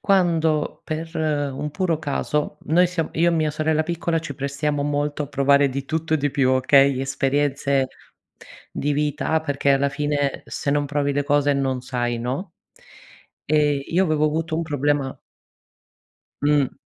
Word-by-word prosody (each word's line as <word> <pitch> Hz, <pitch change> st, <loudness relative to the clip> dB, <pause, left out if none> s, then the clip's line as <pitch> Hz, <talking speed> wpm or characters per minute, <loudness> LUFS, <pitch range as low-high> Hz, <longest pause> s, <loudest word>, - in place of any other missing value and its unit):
quando 165 Hz, -6 st, +1 dB
per 160 Hz, +1 st, -5 dB
un 150 Hz, -2 st, -1 dB
puro 165 Hz, -1 st, 0 dB
caso, 150 Hz, 0 st, -2 dB
noi 175 Hz, +4 st, +3 dB
siam 170 Hz, -2 st, -2 dB
io 170 Hz, +2 st, +3 dB
e -, -, 0 dB
mia 155 Hz, -1 st, +1 dB
sorella 155 Hz, +1 st, 0 dB
piccola 170 Hz, 0 st, -1 dB
ci 145 Hz, -4 st, -6 dB
prestiamo 140 Hz, +1 st, -2 dB
molto 145 Hz, +1 st, -1 dB
a -, -, -9 dB
provare 140 Hz, 0 st, +3 dB
di 135 Hz, +1 st, -4 dB
tutto 160 Hz, +2 st, -1 dB
e -, -, +4 dB
di 145 Hz, -1 st, -1 dB
più 135 Hz, -2 st, +2 dB
okay, 135 Hz, +1 st, +4 dB
esperienze 135 Hz, 0 st, 0 dB, 0.8 s
di 145 Hz, +1 st, -1 dB
vita 150 Hz, +2 st, 0 dB
perché 140 Hz, -2 st, 0 dB
alla 140 Hz, +1 st, +2 dB
fine, 145 Hz, -1 st, -1 dB
se 140 Hz, -, -3 dB
non 145 Hz, 0 st, +1 dB
provi 145 Hz, 0 st, 0 dB
le 145 Hz, +1 st, 0 dB
cose 145 Hz, 0 st, +2 dB
non 135 Hz, -2 st, -1 dB
sai 120 Hz, -2 st, -2 dB
no, 135 Hz, -, -4 dB, 0.9 s
ehm, 150 Hz, -2 st, +2 dB
io 185 Hz, +3 st, +2 dB
avevo 155 Hz, -2 st, +1 dB
avuto 160 Hz, +1 st, -1 dB
un 170 Hz, -, 0 dB
problema 145 Hz, -2 st, -1 dB, 1.2 s
Mh. 145 Hz, -2 st, +2 dB
145 Hz, 155 wpm, -22 LUFS, 140-155 Hz, 1.2 s, e